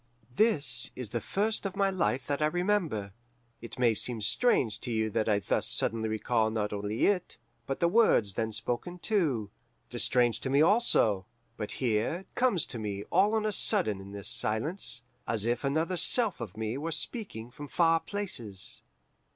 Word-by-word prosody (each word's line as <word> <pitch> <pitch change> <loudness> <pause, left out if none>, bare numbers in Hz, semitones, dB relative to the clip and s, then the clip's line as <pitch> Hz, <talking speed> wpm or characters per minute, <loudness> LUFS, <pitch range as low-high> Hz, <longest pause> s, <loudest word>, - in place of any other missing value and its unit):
"This 140 - +3
is 125 -4 -5
the 120 +1 -3
first 215 - -1
of 195 -1 -4
my 195 -1 +2
life 130 - -1
that 145 +1 -2
I 150 - +4
remember. 170 - -1 0.5
It 115 +2 -10
may 120 -2 +3
seem 115 +2 +3
strange 115 - +1
to 125 - -5
you 110 -1 0
that 110 +1 0
I 105 - +3
thus 100 - 0
suddenly 110 -1 0
recall 110 +1 0
not 105 -2 -2
only 105 +2 -1
it, 190 -3 0 0.3
but 135 - -3
the 170 - +3
words 170 - +3
then 110 +3 -2
spoken 125 - -3
too. 150 - 0 0.4
It - - -7
is - - +2
strange 120 -3 +2
to 130 - -4
me, 140 +1 +3
also. 150 - +3 0.3
But 105 - -5
here 120 - -1
it - - -40
comes 245 - +2
to 120 - -8
me 100 -2 -4
all 200 +5 +3
on 220 -1 0
a 215 - +1
sudden 105 - +2
in 95 +1 -11
this 100 -1 -4
silence, 115 - +1 0.2
as 110 -2 0
if 120 +2 -1
another 160 +6 0
self 210 - +3
of 110 -3 -7
me 110 +4 -3
were 165 +3 -3
speaking 155 - -4
from 145 +2 -9
far 165 +2 +3
places. 160 - -3
125 Hz, 185 wpm, -29 LUFS, 110-180 Hz, 0.5 s, I